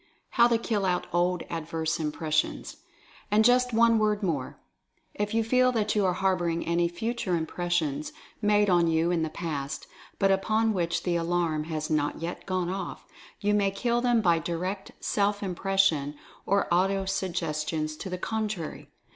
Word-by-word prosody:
HOW 235 -1 +5
TO 235 -1 +3
KILL 220 -3 -1
OUT 180 -1 0
OLD 175 0 +1
ADVERSE 165 0 -2
IMPRESSIONS. 155 0 -1 0.5
And, 215 +1 +4
just 250 +1 +4
one 230 0 +4
word 210 -1 +1
more. 150 -8 -2 0.6
If 210 +1 -2
you 225 - +3
feel 255 +3 +3
that 215 -2 +1
you 205 -3 +2
are 180 - +2
harboring 175 -3 0
any 170 0 +2
Future 200 +1 -2
Impressions 160 -3 -1 0.3
made 210 0 +3
on 175 -3 +4
you 165 +1 +2
in 170 -2 +1
the 160 - -1
past, 150 -4 -4 0.3
but 195 -1 +3
upon 220 +3 +2
which 170 -3 -1
the 175 -2 +1
Alarm 165 -2 0
has 155 -1 -4
not 150 -1 0
yet 170 +4 -6
gone 185 -2 -1
off, 190 -2 -5 0.4
you 205 +1 +2
may 200 -1 +3
kill 235 +5 0
them 240 -2 +3
by 170 -4 +3
direct 180 +4 -4
Self 205 0 0
Impression, 185 -6 +1 0.3
or 200 +1 +2
Auto 195 +2 +2
suggestions 155 -5 -2
to 190 - -6
the 180 - -3
contrary. 215 -4 -4
180 Hz, 165 wpm, -27 LUFS, 165-210 Hz, 0.6 s, HOW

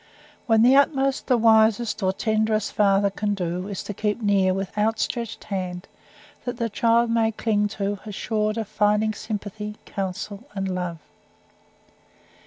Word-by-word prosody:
When 225 -1 +5
the 255 +3 +6
utmost 275 -1 +2
the 250 - +4
wisest 220 0 +3
or 190 -1 +2
tenderest 215 +1 0
father 200 -1 +3
can 205 +1 -1
do, 180 0 -3
is 200 -2 -5
to 205 - -5
keep 210 +2 -1
near 200 -4 +2
with 195 +1 -3
outstretched 225 +2 -1
hand 185 -3 -4 0.6
that 245 -1 -4
the 230 -2 -2
child 230 +2 +2
may 225 -1 +2
cling 210 -1 0
to, 200 0 -2
assured 215 +1 -2
of 220 -3 -2
finding 210 +1 +1
sympathy, 210 0 -5
counsel, 195 +3 -5
and 195 -1 -2
love. 180 -2 -3
210 Hz, 145 wpm, -24 LUFS, 195-225 Hz, 0.6 s, the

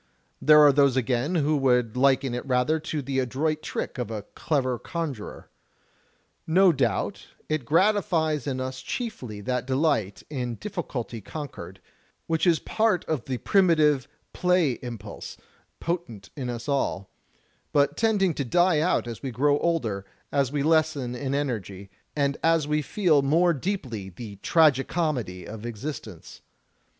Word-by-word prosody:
There 150 0 +7
are 145 -1 +7
those 140 -2 +4
again 130 +6 0
who 155 -1 +2
would 125 -4 +2
liken 135 0 +3
it 125 - -3
rather 130 +5 +2
to 155 -2 -4
the 135 0 -1
adroit 150 +5 -1
trick - - -4
of 125 - -3
a 110 -3 -4
clever 130 -5 -1
conjurer. 155 - -6 1.0
No 185 +3 +5
doubt, 105 -6 -1 0.2
it 155 -5 -1
gratifies 165 - +2
in 130 -2 -2
us 130 0 -4
chiefly 215 - -5
that 125 +2 -2
delight 130 - 0
in 125 -5 -3
difficulty 125 - -5
con 145 +7 -6
quered, - - -10 0.5
which 165 +2 0
is 170 -2 +5
a - - -12
part 220 -4 +1
of 150 -7 -2
the 130 -2 -2
primitive 155 - +3 0.3
play 180 -8 +2
impulse 115 -4 -8 0.4
potent 170 - -4
in 130 -4 -4
us 120 +1 -5
all, 135 -9 -1 0.6
but 145 -1 +2
tending 205 -6 +2
to 140 - -2
die 175 +5 +3
out 165 -3 +1
as 115 -2 -6
we 135 - -3
grow 145 +4 +2
older, 120 - -1 0.3
as 140 -3 +1
we 145 -1 -1
lessen 155 -5 +2
in 135 +2 -2
energy, 100 -9 -4 0.2
and 140 -1 +1
as 165 -2 +3
we 150 0 +1
feel 160 -2 +2
more 165 +5 +3
deeply 130 - -4
the 100 +2 -9
tragi 150 - +4
comedy 125 - -2
of 110 0 -8
existence. 115 - -7
140 Hz, 150 wpm, -26 LUFS, 120-160 Hz, 1.0 s, There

